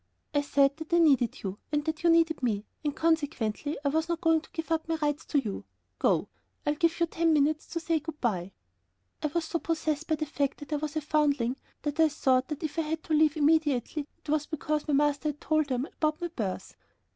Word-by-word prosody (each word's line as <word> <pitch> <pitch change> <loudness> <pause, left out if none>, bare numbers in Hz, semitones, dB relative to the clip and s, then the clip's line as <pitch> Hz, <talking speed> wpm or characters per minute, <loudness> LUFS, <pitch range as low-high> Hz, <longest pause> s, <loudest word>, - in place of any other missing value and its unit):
"I 290 - +3
said 280 0 +3
that 320 0 -8
I - - +6
needed 275 -8 +3
you 195 0 -4
and 295 0 0
that 315 0 -2
you 345 - +4
needed 330 -2 +4
me, 215 -4 0 0.2
and 295 -2 -1
consequently 295 -5 0
I - - +4
was 320 +3 0
not 340 -1 0
going 325 -2 +3
to - - -17
give 325 0 -6
up 320 -1 0
my 330 - 0
rights 295 0 -1
to 295 - 0
you. 215 -7 -4 0.4
Go; - - +2 0.4
I 295 - +2
give 335 +3 +1
you 340 - +4
ten 330 0 +1
minutes 300 +1 +2
to 335 - -3
say 330 -1 0
good 310 0 -8
by." 195 -6 -1 0.7
I - - +1
was 325 +2 -1
so 335 +1 -2
possessed 315 -2 -1
by 315 - +2
the 310 - -2
fact 285 -2 -1
that 290 +1 -7
I - - +2
was 300 +1 -4
a 310 - 0
foundling, 285 -4 +1 0.3
that 295 +1 -3
I 320 -1 +6
thought 260 -3 +2
that 300 0 -5
if 310 +1 -2
I - - +4
had 315 0 -3
to 315 - -2
leave 310 0 +4
immediately 295 -2 +2
it - - -15
was 300 0 +1
because 305 -1 -2
my 295 - +2
master 295 +1 +2
had 295 0 -5
told 310 -1 +1
them 255 -1 -1
about 310 0 -1
my 345 - -3
birth. 215 - -4
305 Hz, 235 wpm, -29 LUFS, 285-320 Hz, 0.7 s, I